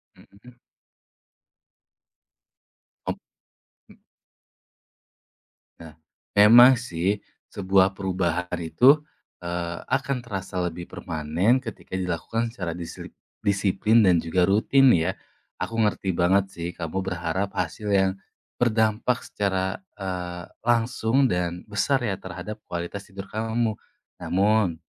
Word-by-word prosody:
Mhm. 120 +5 -18 2.5
Op - - -3 0.7
mmm. - - -20 1.8
Nah, 80 -2 -11 0.4
memang 120 +5 +8
sih 100 -4 -2 0.3
sebuah 95 -1 +2
perubahan 90 -2 -1
itu, 125 - +5 0.4
eee, 85 -1 -4
akan 140 -1 0
terasa 95 -5 -5
lebih 85 +1 -7
permanen 85 - 0
ketika 115 -5 -7
dilakukan 95 +6 -2
secara 90 -7 -4
disli 85 -2 -8 0.3
disiplin 100 +2 +3
dan 90 -3 +5
juga 85 +2 +1
rutin 125 +7 +4
ya. 80 -2 +1 0.5
Aku 115 - -3
ngerti 105 -3 0
banget 95 +3 +3
sih 85 0 -5
kamu 85 +3 -3
berharap 90 +1 -2
hasil 90 +4 -3
yang 95 -1 +3 0.5
berdampak 110 +1 +1
secara, 95 - -2 0.2
eee, 90 -2 -5 0.2
langsung 120 +2 +2
dan 90 -2 -2
besar 130 +6 +1
ya 100 -4 -1
terhadap 95 +4 -8
kualitas 85 +3 -5
tidur 95 0 -8
kamu. 110 +1 -1 0.5
Namun, 100 -2 +2
95 Hz, 105 wpm, -25 LUFS, 90-110 Hz, 2.5 s, memang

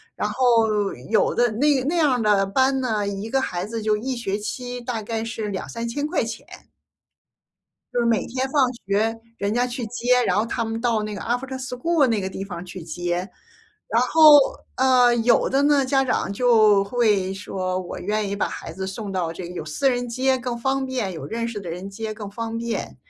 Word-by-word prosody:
然 - - -1
后 225 -5 +2 0.2
有 220 - +3
的 240 -1 +3
那 270 +3 +2
那 315 +6 -1
样 300 -5 +3
儿 245 - 0
的 205 -2 +3
班 265 +6 +2
呢， 215 -5 -1
一 200 +2 -4
个 270 - +2
孩 180 -8 -2
子 225 +1 -5
就 215 0 +2
一 255 +5 -3
学 205 -4 -2
期 245 +3 -5
大 240 -2 -3
概 225 +1 -3
是 225 -2 -4
2000-3000 235 +8 -4
块 335 -6 0
钱。 225 -1 -6 1.5
就 245 - 0
是 - - +1
每 225 -4 +1
天 260 +2 -2
放 265 -3 +3 0.2
学 220 +3 +1 0.2
人 200 +1 -1
家 245 +2 +1
去 245 -2 -4
接， 245 +2 +2
然 - - +1
后 215 - +2
他 230 0 -2
们 225 0 -3
到 230 -3 +1
那 210 0 -4
个 200 - -6
After 260 +2 -2
school 260 +4 +1
那 225 -4 +1
个 190 - -2
地 190 +1 -6
方 175 -3 -7
去 185 -1 -8
接。 175 +3 -3 0.6
然 230 - +2
后， 300 +3 +8 0.4
呃， 250 -2 +5
有 235 +1 +3
的 275 +1 +2
呢， 285 -2 +4
家 270 +1 +2
长 250 -6 -1
就 215 -3 +4
会 200 -3 +1
说 185 -1 -3
我 185 -1 -6
愿 210 +1 -1
意 200 - -2
把 200 - -1
孩 165 - -7
子 190 +2 -5
送 195 +1 -5
到 180 -3 -1
这 175 +1 -7
个 180 - -9
有 175 - -5
私 210 - +1
人 245 -1 -2
接 260 +2 +1
更 245 -1 -4
方 265 +2 -1
便， 250 -8 -2
有 160 - -7
认 230 +1 -3
识 220 -3 -5
的 180 - -8
人 180 +4 -6
接 215 +2 -5
更 210 -2 -7
方 230 +2 -4
便。 235 0 -4
230 Hz, 245 characters per minute, -23 LUFS, 200-250 Hz, 1.5 s, 后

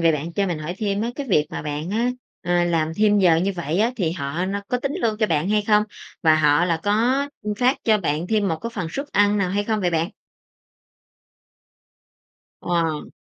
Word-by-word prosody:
vậy 165 -1 +4
bạn 155 +3 -3
cho 200 +3 0
mình 175 -4 -2
hỏi 155 +3 -5
thêm 200 -2 -1
á. 235 - -1
Cái 285 - -4
việc 150 -6 +3
mà - - -5
bạn 150 +3 -4
á, 230 +4 +1 0.3
à, 175 0 +2
làm 160 -2 0
thêm 210 -1 +4
giờ 180 -4 +5
như 190 +4 0
vậy 170 +1 -2
á, 225 +3 +3
thì 170 -6 0
họ 160 +1 -3
no 200 +1 -2
có 250 - 0
tính 275 +2 -2
lương 220 -2 +1
cho 215 - +2
bạn 160 +1 0
hay 210 0 +2
không? 210 0 +4 0.4
Và 160 -1 +5
họ 150 +2 +4
là 165 -2 0
có, 240 +7 +1
ưm, 210 0 -2
phát 255 +5 +2
cho 215 -2 +4
bạn 160 -1 -1
thêm 210 -2 +1
một 160 - -1
phần 200 -7 -3
suất 275 - -4
ăn 205 0 +3
nào 185 -2 0
hay 205 +2 0
không 220 0 -1
vậy 180 -2 +1
bạn? 165 +3 0 2.5
Wow! 165 -3 -1
185 Hz, 215 wpm, -22 LUFS, 165-210 Hz, 2.5 s, giờ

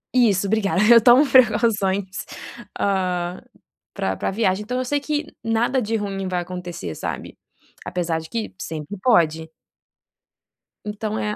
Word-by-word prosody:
Isso, 210 -6 +3
obrigada, 200 -2 +1
eu 230 - +8
tomo 250 +5 +7
preocupações 210 -6 +2 0.5
ah, 180 -2 -1 0.5
para 95 - -1
para - - -2
viagem, 195 -1 0
então 250 +4 -3
eu 255 - -1
sei 290 +3 0
que 300 +1 -3
nada 235 +3 +1
de 225 +1 -2
ruim 195 -3 -3
vai 180 -1 -1
acontecer, 175 - -6
sabe. - - -6 0.5
Apesar 175 -2 -2
de 160 - -12
que 230 -2 -4
sempre 155 +4 -6
pode. 160 -8 +2 1.4
Então 210 +1 -4
é 210 0 -2
200 Hz, 135 wpm, -22 LUFS, 180-230 Hz, 1.4 s, eu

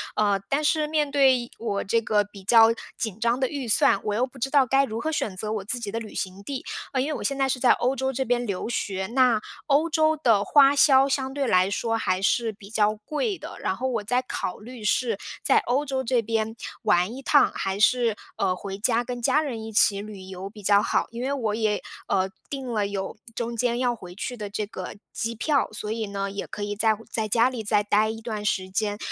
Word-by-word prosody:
呃， 205 -2 +2
但 280 +2 +1
是 310 0 +2
面 300 -1 0
对 265 -4 +3
我 205 -3 -2
这 230 +4 +2
个 210 -2 +1
比 200 -1 -13
较 225 +2 +6 0.2
紧 215 -4 -3
张 235 +2 +1
的 265 - +1
预 275 -2 -5
算， 220 - +4
我 210 - -1
又 245 +5 +1
不 265 - -17
知 260 +2 -2
道 275 -2 +4
该 270 +3 +3
如 225 -4 -3
何 310 - -2
选 220 -10 -2
择 215 +3 -3
我 210 -3 -3
自 240 +5 -1
己 235 - -4
的 225 - -2
旅 215 -2 -9
行 190 +1 -5
地。 270 +4 -5 0.3
呃， 260 - 0
因 270 - -1
为 310 - -2
我 - - -5
现 275 - -1
在 270 -1 +2
是 260 - -1
在 250 - +5
欧 255 +2 0
洲 265 0 -1
这 265 0 -2
边 245 0 0
留 200 -2 -3
学， 190 -4 -2
那 250 -4 +4 0.3
欧 300 +3 +3
洲 315 0 +2
的 230 -9 +3
花 280 +5 +5
销 275 -1 +6
相 265 -1 -1
对 280 0 -1
来 185 -3 +3
说 225 +3 -1
还 185 -4 0
是 225 +3 +1
比 200 -1 -14
较 215 -1 +2
贵 305 - -3
的， - - -9
然 190 - -1
后 260 +6 -2
我 235 -5 -2
在 250 +5 +1
考 185 - -4
虑 235 +1 -10
是 225 +1 +1 0.3
在 - - +5
欧 270 +5 0
洲 265 -1 -2
这 245 -1 +1
边 225 0 -2 0.3
玩 180 +5 +2
一 270 - -8
趟， 285 +1 +4
还 195 +1 -2
是， 235 0 +3 0.2
呃， 185 -2 +1
回 195 +1 -6
家 230 +3 +1
跟 245 0 -5
家 300 +6 +3
人 245 -8 -4
一 220 - -7
起 200 -1 +3
旅 205 -2 -9
游 190 +1 -7
比 210 0 -13
较 200 +1 +5
好。 - - 0
因 235 +1 -6
为 265 +2 -1
我 230 -7 -1
也， 215 -2 0 0.3
呃， 190 0 +1 0.2
订 270 -2 -5
了 210 -2 +1
有 195 -1 -4 0.2
中 235 0 -3
间 235 +1 0
要 245 -1 +1
回 180 -5 -11
去 245 +5 -4
的 210 -3 -6
这 210 +1 -3
个 205 - -7 0.2
机 230 0 -3
票。 280 +5 +1
所 215 0 -5
以 220 -1 -2
呢， 200 0 -3
也 200 - -5
可 205 - -6
以 205 0 -3
在 220 +1 +3 0.2
在 220 -1 -1
家 230 +4 +3
里 245 -4 -5
再 210 0 +2
呆 210 +1 +2
一 225 0 -5
段 215 -2 -4
时 190 -3 -1
间。 205 +2 -1
225 Hz, 260 characters per minute, -25 LUFS, 205-260 Hz, 0.3 s, 较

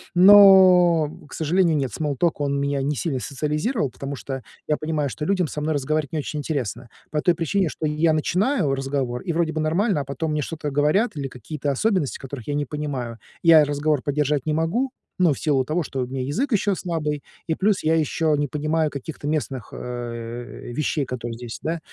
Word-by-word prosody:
Но, 185 -4 +7 0.2
к - - -12
сожалению, 165 +1 +2
нет. 135 -4 -1
Смол 150 -3 -2
ток- 170 +1 0
он 140 -1 0
меня 140 -1 0
не 145 +2 -1
сильно 135 +1 -2
социализировал, 150 - -1
потому 140 +3 -6
что, 135 +2 -6 0.3
я 150 - +2
понимаю, 155 -2 -1
что 150 - -5
людям 185 -1 +1
со 150 - -5
мной 155 +1 -1
разговаривать 150 +2 -1
не 155 - 0
очень 150 +1 -4
интересно, 125 - -3 0.2
по 150 -1 0
той 175 - +3
причине, 175 +3 0
что 155 - -4
я 155 +2 +2
начинаю 180 - +1
разговор, 135 -2 -2
и 170 - -3
вроде 165 -1 +1
бы 160 - -3
нормально, 175 +3 +1
а 140 - -6
потом 145 +4 -3
мне 150 - 0
что-то 150 0 -4
говорят, 150 - +2
или 140 -1 -2
какие-то 140 +4 -4
особенности, 185 - 0
которых 135 -3 -8
я 145 - -1
не 145 0 0
понимаю, 135 -6 -4 0.2
я 165 -2 +8
разговор 145 0 0
поддержать 145 -1 0
не 155 - 0
могу, 170 - 0 0.3
ну, 175 -5 +4
в - - -8
силу 135 -5 +1
того, 160 +5 0
что 135 -3 -4
у 125 - -1
меня 130 +1 -4
язык 225 - -1
еще 205 -2 +2
слабый, 150 -5 -3 0.2
и 160 - 0
плюс 200 0 +1
я 160 +1 +3
еще 155 0 +1
не 145 - 0
понимаю 155 +2 0
каких-то 145 +1 -6
местных, 135 -6 -2
э, 120 0 -6
вещей, 150 +1 -1
которые 120 -2 -5
здесь, 120 -1 -7
да, 165 +1 -1
150 Hz, 200 wpm, -23 LUFS, 135-165 Hz, 0.3 s, я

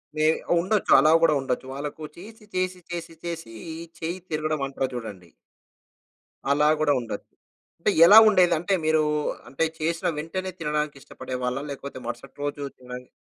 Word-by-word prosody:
మే 155 0 +1 0.3
ఉండొచ్చు. 195 +4 0
అలా 155 +3 +5
గూడా 160 -2 +5
ఉండొచ్చు. 130 -1 -2
వాళ్ళకు 145 +2 -6
చేసి, 215 +4 -12
చేసి, 185 0 -1
చేసి, 170 -1 -5
చేసీ, 165 -9 -6 0.5
చెయ్యి 170 +3 -3
తిరగడమంటారు 145 -4 -2
చూడండి. 100 -7 -7 1.2
అలా 150 +1 +4
గూడా 150 -2 +3
ఉండొచ్చు. 115 -3 -6 0.5
అంటే, 185 - +2
ఎలా 205 +5 +9
ఉండేది? 180 -4 +4
అంటే, 185 +4 -1
మీరూ 155 0 +3 0.5
అంటే, 135 - -1 0.2
చేసిన 165 +1 -1
వెంటనే 185 +4 -4
తినడానికిష్టపడేవాళ్ళా? 140 -4 -3
లేకపోతే 140 -1 -7
మరుసటి 120 +3 -7
రోజు 145 0 -3 0.2
తినడానికి 125 0 -9
155 Hz, 130 wpm, -25 LUFS, 135-170 Hz, 1.2 s, ఎలా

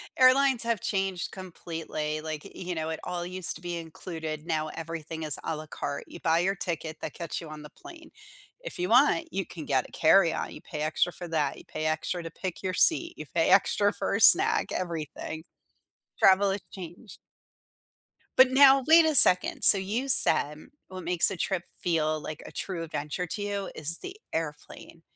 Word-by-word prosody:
Airlines 260 -1 +4
have 230 -3 -1
changed 190 -2 -3
completely, 165 -4 -6
like, 155 -1 -6
y - - -12
you 180 -1 -6
know, 160 0 -4
it 160 - -5
all 175 -1 -5
used 185 0 -4
to - - -12
be 175 -1 -5
included, 160 -1 -7
now 155 -2 -2
everything 165 -1 -7
is 150 -3 -4
a 160 - -3
la 155 - -8
carte; 145 - -6
you - - -12
buy 165 0 +2
your 190 +3 0
ticket 165 -5 -5
that - - -6
gets 170 -1 -6
you 165 - -10
on 155 0 -10
the 150 - -11
plane, 335 - -15 0.5
if - - -9
you 180 - -1
want, 290 +7 +3
you 195 -1 -2
can 160 -4 -10
get 135 -2 0
a - - -22
carry-on, 165 +1 +2
you - - -11
pay 150 -3 -8
extra 155 +3 0
for 175 0 -9
that, 150 -4 -1
you - - -14
pay 155 0 -6
extra 160 +2 -3
to 165 - -8
pick 185 +1 -7
your 185 -1 -2
seat, 335 - +2
you 155 - -8
pay 165 -1 +1
extra 205 +1 +3
for - - -3
a 225 - -2
snack, 400 +5 +5
everything. 160 -2 -5 0.8
Travel 195 +1 +4
has 195 0 -3
changed. 185 +4 -11 1.2
But 260 0 +6
now, 270 0 +6
wait 325 +1 +7
a 310 - 0
second, 185 -6 +7
so 195 - +6
you 215 +7 -3
said 150 - +6 0.2
what 185 -1 -9
makes 175 +3 +1
a - - -4
trip 175 +1 -2 0.2
feel 155 -3 -1
like 155 0 -8
a - - -10
true 180 -4 -5
adventure 155 +2 -5
to 180 +5 -6
you 200 -1 -4
is 160 +2 -1
the 375 +1 -9 0.2
airplane, 160 +1 -7
175 Hz, 195 wpm, -27 LUFS, 160-200 Hz, 1.2 s, wait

